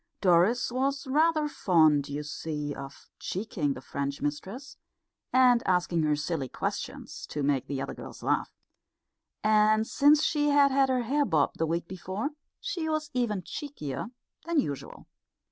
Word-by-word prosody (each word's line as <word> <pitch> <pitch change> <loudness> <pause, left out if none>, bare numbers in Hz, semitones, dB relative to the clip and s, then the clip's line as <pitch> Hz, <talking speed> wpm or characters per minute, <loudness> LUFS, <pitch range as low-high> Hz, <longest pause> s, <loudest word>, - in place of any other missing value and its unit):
Doris 190 +7 +3
was 275 +3 -1
rather 310 +3 +2
fond, 155 - +3
you 145 +1 -3
see, 150 -1 -4
of 135 0 -10
cheeking 175 -8 -2
the 130 - -8
French 140 +1 -4
mistress, 195 - -5 0.6
and 250 -2 +5
asking 180 -2 +2
her 150 -1 +2
silly 150 -3 -3
questions - - -5
to 150 - -3
make 135 -1 +1
the 140 -2 -3
other - - -5
girls - - -10
laugh; - - 0 0.9
and 215 0 +4
since 290 +5 +4
she 295 -2 +2
had 285 -1 +5
had 270 0 +3
her 255 -1 +1
hair 285 +5 +1
bobbed 160 - +1
the 165 - +1
week 170 +1 -2
before, 190 - -4 0.3
she 330 -4 -3
was 310 -1 -2
even 220 -7 -1
cheekier 230 - -5 0.4
than 335 -2 +1
usual. 140 - -4
200 Hz, 150 wpm, -28 LUFS, -, 0.9 s, and